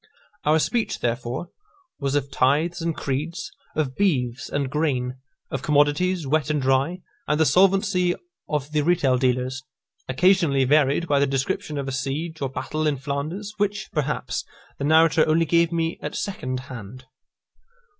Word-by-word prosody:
Our 155 +1 +4
speech, 225 +8 0
therefore, 120 +6 -2 0.5
was 140 -1 -1
of 140 -1 -1
tithes 150 +8 +2
and 165 -1 -2
creeds, 150 +6 -3 0.2
of 145 -4 -1
beeves 145 -8 0
and 145 -1 -1
grain, 130 -3 -1 0.3
of - - -2
commodities 150 +4 +2
wet 155 +3 +1
and 150 -1 +1
dry, 135 +7 +1 0.3
and 150 0 +1
the 160 - +5
solvency 185 +2 +3 0.3
of 150 -1 -2
the 150 -1 +2
retail 145 -6 +2
dealers, 130 0 0 0.5
occasionally 160 -1 +3
varied 145 +4 +3
by 145 -2 +3
the 140 - +3
description 140 +3 -2
of 140 -1 -3
a - - -2
siege, 145 +5 -3
or 135 - -1
battle, 155 +4 -2
in 145 -2 +1
Flanders, 150 +10 -4
which, 205 0 -1
perhaps, 150 -1 -2 0.4
the 140 - -1
narrator 160 +1 +5
only 160 +1 +3
gave 170 +1 +3
me 165 -1 -1
at - - -5
second 130 -10 -3
hand. 130 -1 -9
150 Hz, 155 wpm, -24 LUFS, 135-170 Hz, 0.5 s, the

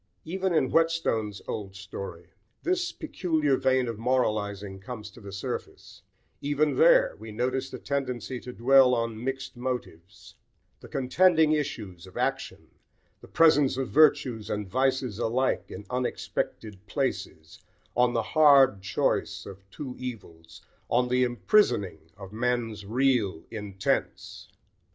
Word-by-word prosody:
Even 190 +3 -1
in 155 -6 +2
Whetstone's 165 - +1
old 100 -3 -5
story 100 -4 -8 0.3
this 360 -1 0
peculiar 160 - 0
vein 130 -1 +2
of 115 -2 -5
moralising 105 -5 -1
comes 105 +1 -8
to 120 +2 -15
the 100 -1 -9
surface: 95 +1 -6 0.4
even 145 +1 +1
there, - - +5
we 110 - -9
notice 130 +4 -2
the - - -7
tendency 130 -2 -3
to 125 - -8
dwell 125 +1 +5
on 115 -1 -3
mixed 135 0 -4
motives, 120 -7 -6 0.5
the - - -12
contending 160 +4 +3
issues 105 - -3
of 95 - -12
action, - - -3 0.5
the - - -14
presence 150 -5 +4
of 135 -1 -2
virtues 135 -7 +3
and 105 -1 -3
vices 130 0 0
alike 130 +4 0
in 105 - -8
unexpected 110 -5 -3
places, 95 - -3 0.4
on 125 0 +3
"the 115 -2 0
hard 140 -9 +6
choice 95 - -1
of 100 0 -12
two 130 +4 -7
evils," 85 -10 -9 0.3
on 125 +1 +2
the 125 +1 +3
"imprisoning" 120 - +1
of 100 0 -10
men's 115 -3 -2
"real 115 -8 +1
intents." 100 -3 -3
125 Hz, 130 wpm, -27 LUFS, 105-135 Hz, 0.5 s, hard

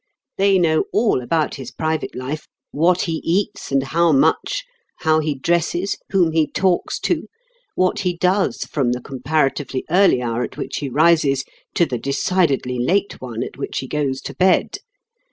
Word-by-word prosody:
They 195 0 +4
know 160 -3 +2
all 215 - +2
about 155 +4 0
his 130 -3 -7
private 160 +3 -3
life, 140 +5 -5 0.2
what 175 +4 +2
he 165 -2 -2
eats, 185 -1 -1
and 135 -1 +2
how 165 +4 +2
much; 155 - +2 0.4
how 155 0 +3
he 155 -2 -1
dresses, 170 +6 0
whom 180 -4 +3
he 160 -1 +2
talks 185 -2 0
to, - - -1 0.5
what 185 0 +1
he 180 -2 -1
does 185 +3 +1
from 130 -5 -1
the 125 - -4
comparatively 135 0 -1
early 185 -6 +5
hour 120 -1 -2
at 120 - -5
which - - -4
he 140 - -3
rises 150 -2 +3 0.3
to 170 - +4
the 125 -6 -3
decidedly 140 -3 0
late 195 +11 0
one 120 -2 -4
at - - -8
which - - -4
he 130 - -3
goes 135 -2 -2
to - - -7
bed. 185 0 +2
155 Hz, 170 wpm, -20 LUFS, 135-180 Hz, 0.5 s, early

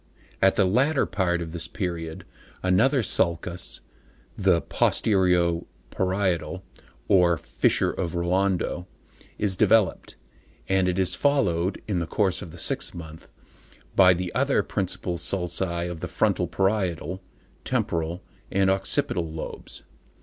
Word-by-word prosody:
At 95 0 +5
the 100 - +3
latter 135 +10 +2
part 90 -3 0
of 80 - -8
this 85 0 -3
period, 85 -4 -4 0.4
another 115 +9 +3
sulcus, 85 -1 -1 0.5
the 95 -3 +3
"posterio 90 -4 +2 0.2
parietal," 95 -1 -1 0.4
or 90 -3 +4
"Fissure - - +1
of 90 -1 -3
Rolando" 90 0 0 0.5
is 100 -3 +1
developed, 110 +1 +2 0.5
and 95 -1 +2
it 90 0 0
is 95 -1 +1
followed, 95 -10 +1
in 100 -5 0
the 85 - -3
course 95 -2 0
of 90 - -7
the - - -11
sixth - - -1
month, 80 -2 -10 0.7
by 95 -2 +7
the 90 0 -4
other - - +2
principal 90 -2 -2
sulci 85 -1 -1
of 85 -2 -6
the - - -4
frontal, - - +1
parietal, 95 -3 -1 0.4
temporal 85 +2 -1 0.3
and 95 0 +3
occipital 90 -3 0
lobes. 80 0 -7
90 Hz, 125 wpm, -25 LUFS, 85-95 Hz, 0.7 s, by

